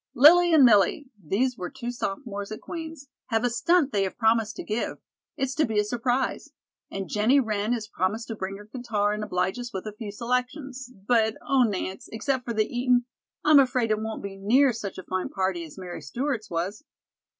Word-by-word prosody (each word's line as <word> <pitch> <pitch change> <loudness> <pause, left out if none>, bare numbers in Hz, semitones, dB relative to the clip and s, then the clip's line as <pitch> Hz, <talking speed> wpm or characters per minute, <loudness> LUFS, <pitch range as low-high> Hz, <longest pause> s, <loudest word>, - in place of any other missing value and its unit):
"Lillie 345 +7 +7
and 305 -5 +7
Millie," 235 - +4
these 240 +10 0
were 180 -1 -4
two 245 -2 -5
sophomores 205 -3 -4
at 215 - -5
Queen's, 320 -4 -7 0.2
"have 225 0 0
a 245 - +1
stunt 285 +5 +2
they 200 - +1
have 190 -1 -2
promised 225 -1 +2
to - - -6
give. 215 +2 -2 0.4
It's 265 -1 -1
to 310 - +2
be 220 -5 -1
a 210 - +4
surprise. 245 +4 -1 0.4
And 195 -1 -5
Jennie 225 +7 +3
Wren 215 -3 -1
has 225 -3 -3
promised 210 +4 -2
to 225 - -3
bring 195 -1 -5
her 205 - -12
guitar 215 -3 -1
and 210 0 -3
oblige 185 +2 -1
us 245 0 -6
with 190 -3 -5
a 215 - -5
few 210 -1 -7
selections, 250 +3 -3 0.2
but, 220 -3 +3
oh, 275 -2 +4
Nance, 195 -4 -1
except 250 +3 -1
for 235 - -2
the 215 0 +3
eatin', 245 +1 +1 0.4
I'm 300 -1 +8
afraid 250 -4 +2
it 215 - +2
won't 220 0 -5
be 195 -1 -6
near 250 +7 +4
such 200 -3 -6
a 185 - -7
fine 185 0 -3
party 190 -3 -1
as 155 - -13
Mary 180 -3 -7
Stewart's 235 - -3
was." 180 - -3
225 Hz, 205 wpm, -26 LUFS, 205-255 Hz, 0.4 s, I'm